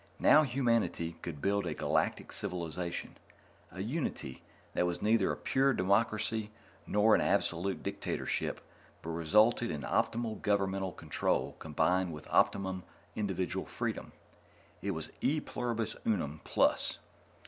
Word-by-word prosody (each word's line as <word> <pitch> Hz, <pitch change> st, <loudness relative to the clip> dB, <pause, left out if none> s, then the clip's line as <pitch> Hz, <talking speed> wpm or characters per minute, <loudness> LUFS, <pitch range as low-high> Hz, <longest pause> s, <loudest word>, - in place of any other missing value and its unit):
Now 155 Hz, -, +7 dB
humanity 115 Hz, -, +1 dB
could 75 Hz, -5 st, -6 dB
build 100 Hz, -2 st, +1 dB
a -, -, -2 dB
Galactic -, -, 0 dB
Civilization 85 Hz, 0 st, -4 dB, 0.5 s
a 95 Hz, -, -6 dB
unity 110 Hz, -, -3 dB, 0.3 s
that 90 Hz, -, +2 dB
was 90 Hz, 0 st, -2 dB
neither 110 Hz, 0 st, +3 dB
a -, -, -3 dB
pure 135 Hz, +1 st, +2 dB
democracy 110 Hz, +2 st, +1 dB, 0.4 s
nor 105 Hz, +2 st, +4 dB
an -, -, +5 dB
absolute 90 Hz, +3 st, 0 dB
dictatorship, -, -, -2 dB, 0.4 s
but 80 Hz, -, -4 dB
resulted 105 Hz, +9 st, +3 dB
in 75 Hz, -3 st, -3 dB
optimum 115 Hz, -1 st, 0 dB
governmental 95 Hz, -2 st, 0 dB
control -, -, -1 dB
combined 85 Hz, +3 st, +1 dB
with 75 Hz, -, -9 dB
optimum 95 Hz, -1 st, +2 dB, 0.3 s
individual 95 Hz, -5 st, -2 dB
freedom. -, -, -3 dB, 0.7 s
It 100 Hz, -, -2 dB
was 80 Hz, -, -5 dB
e 155 Hz, +3 st, +2 dB
pluribus 115 Hz, -5 st, -3 dB
unum 80 Hz, -9 st, -1 dB
plus. -, -, +2 dB
100 Hz, 125 wpm, -32 LUFS, 85-110 Hz, 0.7 s, Now